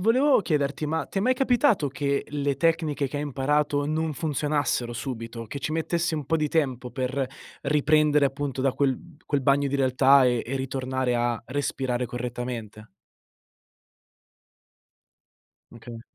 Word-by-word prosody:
volevo 255 +6 +4
chiederti, 150 -3 -1
ma 160 +2 -1
ti 195 - -3
è - - +1
mai 255 +5 +3
capitato 250 - +3
che 140 +1 -1
le 140 -2 -1
tecniche 160 -3 +1
che 145 - -6
hai 145 - -2
imparato 145 +1 0
non 155 +1 -1
funzionassero 145 -5 -1
subito? 115 -2 -6
Che 140 - -6
ci - - -3
mettesse 165 0 -1
un 150 - -4
po' 165 - +1
di 155 -1 0
tempo 130 -6 -1
per 130 +1 -1 0.4
riprendere 150 0 +3
appunto 135 -1 -2
da 135 -1 +2
quel 135 -2 +1 0.3
quel 145 -2 0
bagno 140 +1 +2
di 140 - -1
realtà 135 +1 +5
e 120 -2 +2
e 135 +3 -3
ritornare 130 -1 -2
a 120 -1 0
respirare 125 -2 -2
correttamente? 120 -3 -5 2.9
Okay. 115 0 -10
140 Hz, 145 wpm, -26 LUFS, 125-150 Hz, 2.9 s, realtà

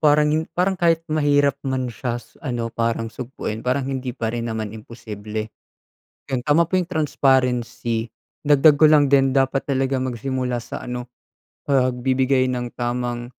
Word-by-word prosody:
Parang 150 0 +4
yung 160 +1 +1
parang 185 +1 +1
kahit 165 -1 +3
mahirap 145 -2 +2
man 130 -2 -2
siya 120 +2 -3 0.2
ano, 120 -5 -3
parang 115 -1 -1
sugpuin 120 -3 -5
parang 130 +2 0
hindi 130 -2 -4
pa 115 -1 -2
rin 120 0 -3
naman 110 -2 -4
imposible. 110 -1 -7 0.8
'Yon, 130 - +1
tama 150 +3 +5
po 185 +3 0
yung 175 - -2
transparency, 125 -7 +1 0.4
dagdag 145 0 +6
ko 155 - +8
lang 145 -2 +4
din 135 -1 +4
dapat 135 0 +1
talaga 135 -1 0
magsimula 125 -1 -2
sa - - -6
ano, 125 0 -5 0.6
pagbibigay 130 0 +2
ng 125 -1 -4
tamang, 120 0 -2
130 Hz, 150 wpm, -22 LUFS, 120-140 Hz, 0.8 s, ko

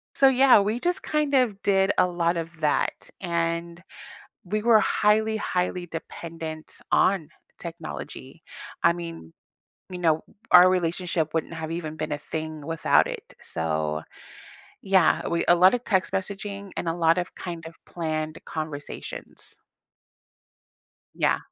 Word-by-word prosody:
So, 270 - +6
yeah, 260 -4 +6
we 215 +4 0
just, 355 +6 -1
kind 300 -2 0
of, 235 -7 +2
did 195 -1 +3
a - - +5
lot 175 -1 0
of 165 0 -3
that, 150 -1 0
and, 170 -1 -2 0.6
we 210 +4 -1
were 225 -1 +5
highly, 220 +1 +2
highly 180 -3 -1
dependent 165 -1 -7 0.2
on 185 -5 +3 0.3
technology. 165 -3 -8 0.4
I 170 - +6
mean, 165 - -8 0.6
you 180 - -5
know, 160 -2 +2 0.3
our 180 0 +9
relationship 175 -3 0
wouldn't 160 +1 -1
have 160 0 -5
even 160 -2 -4
been - - -4
a 145 - -1
thing 155 0 -5
without 165 0 +3
it, - - -8
so, 80 -1 -2 0.8
yeah, 190 -4 +3
we 170 - 0
a 175 - +7
lotta 185 +7 +5
text 190 -5 0
messaging, 200 0 -4
and 170 - -3
a 165 - +1
lot 165 0 +3
of, 175 -1 -2
kind 170 -3 -6
of, 165 0 -9
planned 155 -2 -3
conversations. 155 -2 -7 1.6
Yeah. - - +2
170 Hz, 135 wpm, -25 LUFS, 160-195 Hz, 1.6 s, our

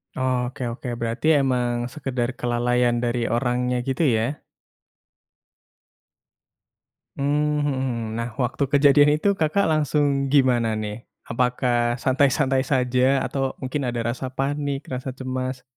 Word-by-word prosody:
Oh, 130 0 0
oke 130 0 -7
oke. 125 +1 -8
Berarti 115 +6 -2
emang 120 -2 -1
sekadar 130 -5 -2
kelalaian 120 0 +1
dari 120 0 0
orangnya 125 0 0
gitu, 135 +5 0
ya? 120 +4 0 2.8
Hmm, 150 +1 0
mhm 145 -1 0
mhm. 130 -2 -1 0.2
Nah, 115 - -3
waktu 125 +3 -1
kejadian 145 +1 +5
itu, 200 +6 +1
Kakak 160 +5 +1
langsung 145 -2 +1
gimana, 120 -5 +3
nih? 105 +1 -5 0.2
Apakah 120 0 +1
santai-santai 135 0 +2
saja? 130 0 +2
Atau 135 -1 -2
mungkin 130 0 -2
ada 120 -1 -2
rasa 130 +1 -5
panik, 140 +1 -2
rasa 130 +1 -4
cemas? 130 -1 -4
130 Hz, 120 wpm, -23 LUFS, 120-140 Hz, 2.8 s, kejadian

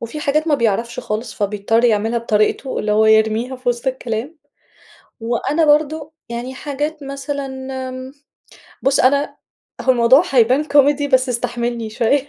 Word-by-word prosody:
وفي 230 +6 -6
حاجات 305 +3 0
ما 295 - +4
بيعرفش 235 0 -1
خالص 220 -1 -4
فبيضطّر 210 +3 0
يعملها 225 +1 +2
بطريقتُه، 225 +3 0
اللي 210 0 -1
هو 215 +1 +3
يرميها 220 +4 +2
في 255 -1 -4
وسط 240 +2 -2
الكلام، 255 +3 -3 0.8
وأنا 255 +7 0
برضه 300 +1 +1 0.2
يعني 240 +2 -5
حاجات 295 +2 -4
مثلًا 275 0 -5 0.4
آمم، 255 +1 -8 0.7
بُصّ 270 0 +2
أنا 280 +3 +2 0.4
هو 260 - +3
الموضوع 250 +5 +5
هيبان 255 +3 +3
كوميدي 290 -1 +3
بس 260 -1 +3
استحملني 235 -2 -2
شوية. 265 +5 0
255 Hz, 140 wpm, -19 LUFS, 230-280 Hz, 0.8 s, الموضوع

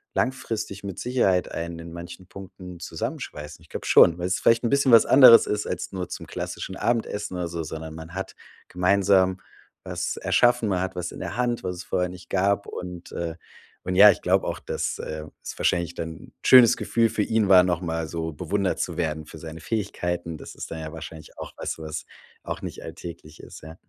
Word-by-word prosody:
langfristig 115 -6 -2
mit 100 -3 -6
Sicherheit 110 -8 +1
einen 85 0 -5
in 85 0 -9
manchen 85 +2 -9
Punkten 90 -1 -11
zusammenschweißen. 75 -2 -6
Ich - - -20
glaub - - -6
schon, 85 0 +6
weil's 90 +2 -1
vielleicht 115 +1 +3
'n 115 - +1
bisschen 140 -2 +3
was 115 -1 +8
anderes 130 -4 +9
ist 105 0 -2
als - - -4
nur 90 -2 -5
zum - - -7
klassischen 95 - -5
Abendessen 105 -4 -1
oder 90 -1 -2
so, 85 0 -4
sondern 80 0 -6
man 80 +2 -10
hat 95 0 -5 0.3
gemeinsam 95 0 +3 0.5
was - - -3
erschaffen. 120 -3 +3
Man 90 -1 0
hat 95 -1 -3
was 90 -1 -4
in - - -9
der 115 - -5
Hand, 120 -1 0
was 90 0 -3
es 85 - -7
vorher 90 +1 -1
nicht 90 -1 -12
gab. 100 +1 +1
Und, 90 -1 -8
äh, 85 -1 -3 0.5
und 90 0 -2
ja, 105 +1 +10
ich - - -5
glaub - - +2
auch, - - -3
dass, - - -3
äh, 75 0 -5 0.2
es - - -7
wahrscheinlich 85 0 0
dann 80 0 -4
'n - - -15
schönes 125 -3 +8
Gefühl 115 -1 +1
für 105 -1 0
ihn 110 -2 +1
war, 90 -1 +8
noch 90 -1 0
mal 80 -2 -2
so 80 0 -4
bewundert 100 +5 -1
zu 85 - -2
werden 80 -2 -2
für 80 - -11
seine 80 +1 -8
Fähigkeiten. 90 -5 -3
Das - - -10
ist - - -7
dann 80 - -6
ja 80 - -6
wahrscheinlich 80 -1 -10
auch - - -7
weißt - - -4
du, 80 - -8
was 80 0 -5 0.4
auch - - -5
nicht - - -7
alltäglich 80 -2 -9
ist, - - -12
ja. 80 +1 -10
90 Hz, 210 wpm, -25 LUFS, 85-100 Hz, 0.5 s, ja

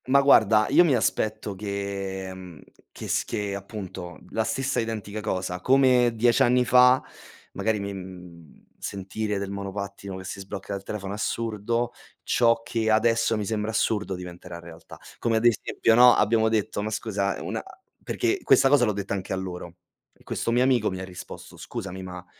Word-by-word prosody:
Ma 135 +2 +5
guarda, 110 -6 +5
io 160 +6 +6
mi 150 -7 +3
aspetto 110 -3 -1
che 100 -1 -4
mhmm, 90 -4 -11 0.3
che - - -8
s - - +1
che 100 -1 -3
appunto 95 -3 -7
la 110 - 0
stessa 135 +5 -1
identica 110 -2 -4
cosa. 90 -3 -3
Come 130 0 +4
10 120 +1 +3
anni 125 +1 +4
fa, 125 +1 +6 0.5
magari 110 -1 0
mi 100 0 -4
mhmm, 90 -4 -11 0.2
sentire 100 +2 -3
del 100 0 -4
monopattino 100 0 -6
che 95 - -8
si 95 +2 -6
sblocca 95 +1 -6
dal 100 - -4
telefono 100 -1 -5
assurdo, 115 +2 -2 0.3
ciò 115 -1 +2
che 115 -1 -1
adesso 115 +1 +3
mi 105 - -2
sembra 105 +1 -2
assurdo 105 -3 0
diventerà 90 -1 -9
realtà. 85 -1 -12 0.2
Come 115 -1 +1
ad 110 - 0
esempio, 115 0 +2
no, 120 +1 +8
abbiamo 110 +1 +3
detto, 110 -2 -1
ma 105 - -2
scusa, 100 -3 -2
una - - -3 0.4
perché 370 +2 0
questa 135 - +5
cosa 140 -3 +5
l'ho 105 - 0
detta 100 0 -4
anche 95 -1 -3
a - - 0
loro, 90 -2 -6 0.4
e - - -25
questo - - -3
mio 120 +2 +3
amico 125 -4 +2
mi 95 - -5
ha - - -5
risposto: 90 -1 -10
"Scusami, 95 0 -6
ma 90 -1 -8
105 Hz, 175 wpm, -25 LUFS, 95-115 Hz, 0.5 s, no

